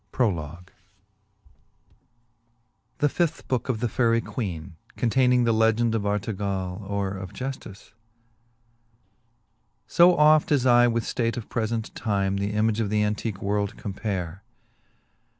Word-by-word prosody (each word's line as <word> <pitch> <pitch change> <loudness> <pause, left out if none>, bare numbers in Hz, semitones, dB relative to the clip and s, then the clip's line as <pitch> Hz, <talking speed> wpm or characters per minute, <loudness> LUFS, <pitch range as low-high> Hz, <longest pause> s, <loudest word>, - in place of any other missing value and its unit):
CO 85 - -1 2.4
The 145 - +2
fifth 170 +2 -1
Booke 130 -1 -1
of 115 -3 -1
the 120 - +1
Faerie 115 0 +2
Queene. 95 -8 -5 0.2
Contayningy 125 0 +3
The 115 - +3
Legende 115 +1 +2
of 105 -2 -1
Artegall 100 -3 -2
Or 100 -1 -1
of 95 -1 -7
Jujike. 125 -5 -7 2.1
I. - - +10
O 175 0 +6
oft 150 0 +5
as 135 -4 +3
I 120 -1 +6
with 115 -1 0
ftate 115 0 -1
of 115 - -6
prefent 115 -1 -2
time 100 -3 -1
The 100 +1 -2
image 110 +1 +1
of 110 -3 0
the 105 0 +1
antique 105 -1 -3
world 100 0 -1
compare. 95 -3 -4
110 Hz, 130 wpm, -25 LUFS, 100-120 Hz, 2.4 s, I